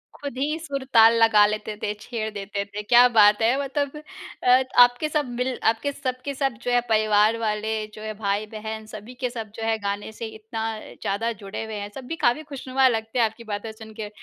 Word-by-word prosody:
खुद 280 -3 -7
ही 300 +4 -1
सुर-ताल 265 -7 +4
लगा 210 -2 +6
लेते 215 0 -3
थे, 210 - 0
छेड़ 220 -1 -4
देते 200 0 -4
थे। 205 +1 -6
क्या 240 +3 +7
बात 210 +1 +6
है! 235 +4 +3
मतलब 280 +1 -2 0.5
अ, 255 +1 +5 0.2
आपके 245 +5 +1
सब 300 -1 0
मिल 250 +1 -2
आपके 285 +6 -3
सब 255 -2 -4
के 280 - -2
सब 270 -2 0
जो 245 - -1
है 245 0 +4
परिवार 215 0 +3
वाले 215 0 -1 0.2
जो 215 - -10
है, 215 0 -4
भाई-बहन 215 +1 -3
सभी 215 +3 -10
के 250 - 0
सब 225 -4 -7
जो 225 - -6
है 225 0 +1
गाने 205 +1 -3
से 230 - -7
इतना 220 +1 -6 0.2
ज़्यादा 225 +4 -3
जुड़े 200 +2 -5
हुए 220 - -6
हैं, 205 0 -5
सब 265 -2 -8
भी 330 - -3
काफ़ी 245 +6 +2
खुशनुमा 265 -1 +1
लगते 225 0 -1
हैं 230 - +5
आपकी 225 +2 -6
बातें 220 0 -5
सुन 220 0 -12
के। 210 -1 -4
225 Hz, 210 wpm, -24 LUFS, 215-255 Hz, 0.5 s, क्या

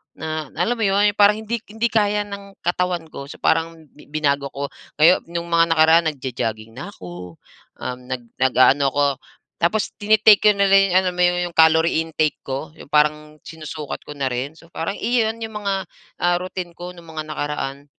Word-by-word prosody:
Na 155 -2 -5
alam 180 +9 0
mo 225 - -3
'yon, 205 +1 +3
parang 210 +1 +5
hindi 220 +1 -3
hindi 225 +2 0
kaya 210 -1 +2
ng 200 -1 -10
katawan 175 -2 -1
ko. 140 - -7
So, - - -12
parang 165 -1 0
bi 150 - -16
binago 140 -2 0
ko. 140 0 -3 0.3
Ngayo 170 +4 +5
nung 170 0 -4
mga 165 0 +5
nakaraan, 160 +1 +5
nagjo-jogging 115 -5 -5
na 175 +10 -7
ako. 90 -1 -10 0.4
Um, 125 0 -5
nag 125 -2 -4 0.2
nag-aano 130 +2 +4
ako 145 +1 +2 0.6
tapos, 205 +5 +1
tini-take 215 0 +5
ko 210 - +7
na 200 - +3
lang 195 0 +5
yong, - - 0
alam 185 -1 -1
mo 180 - -1
yong 175 -1 +1
calorie 160 0 +4
intake 160 -1 -1
ko, 135 +3 -5
yong 145 - -14
parang 150 0 +1
sinusukat 155 -2 -7
ko - - -8
na 140 - -1
rin. 130 +4 -3
So, 165 0 -18
parang 165 +5 -3
iyon 225 -1 +1
'yong 220 -1 -5
mga, 205 -2 -2 0.5
ah, 175 0 +3
routine 185 -1 -6
ko 175 +1 -7
nung 170 -1 -14
mga 155 -1 -5
nakaraan. 145 -2 -4
165 Hz, 185 wpm, -21 LUFS, 145-195 Hz, 0.6 s, ko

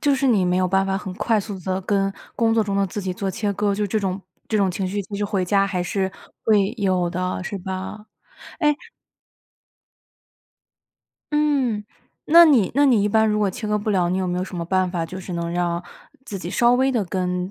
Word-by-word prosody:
就 285 -1 +3
是 270 0 0
你 215 -7 +3
没 180 0 +1
有 185 0 +2
办 195 +1 +2
法 195 0 0
很 195 -1 -5
快 225 +3 +1
速 205 -1 -5
地 185 +1 -2
跟 195 0 0 0.2
工 225 -1 +2
作 225 - +3
中 200 -1 -2
的 200 0 +2
自 200 +3 -5
己 185 -2 -3
做 195 +1 -3
切 205 +2 -2
割， 205 0 0
就 210 +1 -1
这 215 +2 -1
种 190 -1 -2 0.3
这 220 - +1
种 195 -2 +2
情 185 +2 -2
绪 200 +2 -2
就 200 +2 -9
是 205 - -1
回 195 -2 -1
家 195 +2 +2
还 185 -3 -2
是 190 +1 -1 0.3
会 210 -2 +3
有 185 -3 +1
的。 180 +1 -2
是 200 - -4
吧？ 190 +3 -6 0.5
哎 300 -3 +3 2.6
嗯， 275 -8 +1 0.4
那 340 +2 +9
你 255 - +4
那 285 +2 +4
你 245 -7 +4
一 205 - +2
般 220 +1 +3
如 210 -1 +1
果 205 -2 +2
切 215 +4 -6
割 210 0 +1
不 210 - -5
了， 180 -4 +2
你 185 - 0
有 185 - -1
没 180 - -1
有 180 - -1
什 190 - -10
么 170 -1 -4
办 185 +1 +1
法 170 -2 -2
就 185 +3 -7
是 185 0 -7
能 170 -1 -3
让 175 0 -1 0.4
自 200 - -5
己 175 -1 -6
稍 240 +4 +4
微 265 +2 +2
地 235 -4 +1
跟 180 0 -2
195 Hz, 245 characters per minute, -22 LUFS, 185-215 Hz, 2.6 s, 那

